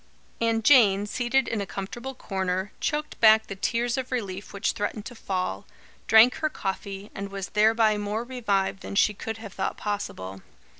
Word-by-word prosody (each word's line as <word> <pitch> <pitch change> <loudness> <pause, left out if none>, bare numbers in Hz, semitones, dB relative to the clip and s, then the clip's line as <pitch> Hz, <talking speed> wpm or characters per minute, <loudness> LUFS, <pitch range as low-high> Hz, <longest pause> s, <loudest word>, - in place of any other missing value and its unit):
And 225 -1 +1
Jane, 210 -6 +6
seated 245 +4 0
in 220 - -2
a 200 - -4
comfortable 240 +8 -6
corner, 190 -3 -2
choked 300 0 -2
back 220 -1 +6
the 195 - -7
tears 235 +5 0
of 260 0 -6
relief 200 -6 -4
which 200 +2 -1
threatened 210 -1 -4
to 245 - -7
fall, 185 - -3 0.4
drank 220 +3 +7
her 310 - 0
coffee, 195 -4 -5
and 200 0 -5
was 195 -1 -5
thereby 220 0 +3
more 205 +2 -2
revived 205 -7 -1
than - - -7
she 210 +1 +4
could 225 +2 -5
have 220 -3 -9
thought 190 - -3
possible. 95 - -4
210 Hz, 170 wpm, -26 LUFS, 195-235 Hz, 0.4 s, drank